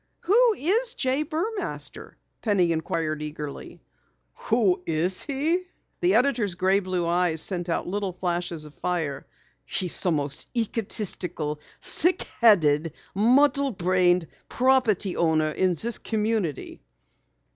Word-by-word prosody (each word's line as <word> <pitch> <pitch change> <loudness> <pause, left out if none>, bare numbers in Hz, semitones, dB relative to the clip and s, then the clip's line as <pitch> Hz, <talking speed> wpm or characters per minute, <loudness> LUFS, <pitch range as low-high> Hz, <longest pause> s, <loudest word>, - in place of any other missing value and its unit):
"Who 455 +6 +4
is 460 - +2
J. 265 - 0
Burmaster?" 350 +8 -4 0.3
Penny 190 -6 +2
inquired 160 -1 -2
eagerly. 150 -1 -7 0.7
"Who 210 -6 +3
is 170 +3 -1
he?" 315 +6 -1 0.3
The 360 +1 +2
editor's 240 -8 +2
gray 190 +2 +2
blue 185 -3 -2
eyes 170 -1 +1
sent 175 0 0
out 165 - -1
little 195 +1 -2
flashes 175 -3 -2
of 150 - -13
fire. 160 -7 -3 0.4
"He's 180 -3 -2
the 185 - +2
most 145 -3 -2
egotistical, 195 -9 -2 0.2
thick 355 +3 +1 0.2
headed, 165 -8 +4 0.2
muddle 275 +6 +3
brained 180 -3 +2 0.2
property 245 -7 +2
owner 160 -2 +2
in 185 +3 +1
this 230 +7 -2
community." 215 - -2
185 Hz, 115 wpm, -25 LUFS, 170-250 Hz, 0.7 s, Who